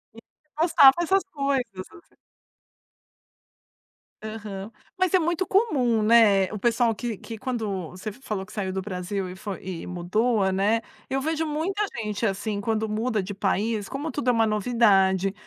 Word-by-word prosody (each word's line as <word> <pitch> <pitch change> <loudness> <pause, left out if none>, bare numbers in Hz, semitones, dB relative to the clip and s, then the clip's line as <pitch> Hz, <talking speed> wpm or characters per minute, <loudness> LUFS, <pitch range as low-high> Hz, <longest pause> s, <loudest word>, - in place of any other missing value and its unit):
E - - -11 0.4
postava 310 -5 +7
esas 385 +3 +2
coisas, 260 -9 -2
assim. 340 - -22 2.1
Aham. 215 -1 -7 0.3
Mas 370 -1 +1
é 370 - +6
muito 345 +3 0
comum, 265 - +2
né, 210 -3 +5
o - - -3
pessoal 230 0 +2
que 225 0 -4
que 225 -1 -8
quando 210 - -3
você 185 +4 -10
f 210 - -12
falou 200 -6 -4
que - - -15
saiu 190 -3 -2
do 190 0 -3
Brasil 185 0 -4
e 180 - -8
foi 195 0 -6
e 180 -3 -5
mudou, 195 +4 +1
né, 205 +4 +2 0.3
eu 270 +1 0
vejo 320 +3 -1
muita 360 +8 -1 0.2
gente 210 +1 -2
assim 205 +1 -2
quando 220 0 -1
muda 215 0 -1
de 200 +2 -6
país, 205 +1 -1
como 290 +4 -4
tudo 255 -4 -1
é - - +6
uma 225 -1 +3
novidade. 195 -3 +3
220 Hz, 165 wpm, -25 LUFS, 195-255 Hz, 2.1 s, postava